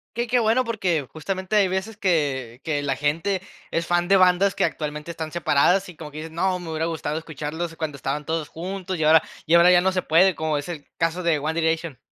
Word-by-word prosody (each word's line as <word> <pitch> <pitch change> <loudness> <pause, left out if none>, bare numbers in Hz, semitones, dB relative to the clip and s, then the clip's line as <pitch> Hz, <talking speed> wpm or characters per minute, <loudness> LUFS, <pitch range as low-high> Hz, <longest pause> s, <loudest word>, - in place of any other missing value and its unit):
Qué 240 +1 0
qué 245 +2 +2
bueno, 230 +3 +3
porque, 180 - -1
justamente, 190 +5 -3
hay 200 -2 +5
veces 190 +4 -3
que 140 - -1
que 150 -3 -1
la 135 -2 -1
gente 165 +7 -1 0.3
es 170 0 -1
fan 175 0 +1
de 195 0 +5
bandas 185 +1 +4
que - - 0
actualmente 150 +1 -4
están 160 -2 -6
separadas 175 +3 +2
y 180 - -11
como 150 -1 -9
que 150 - -10
dicen: 160 +1 -7
"No, 185 +2 0
me 170 -2 -8
hubiera 160 +1 -1
gustado 155 -2 -3
escucharlos 160 +2 -5
cuando 160 -3 -4
estaban 140 +2 -3
todos 160 -1 -2
juntos, 185 +2 -5
y 160 - -1
ahora 155 +1 +6 0.2
y 160 - +1
ahora 170 +1 +7
ya 175 0 +6
no 190 - +2
se 185 -1 0
puede", 180 +4 +4
como 155 -1 -1
es 145 - -5
el 160 -5 -7
caso 165 +2 0
de 170 -3 +2
One 155 +3 -2
Direction. 160 -4 -1
165 Hz, 230 wpm, -23 LUFS, 155-185 Hz, 0.3 s, ahora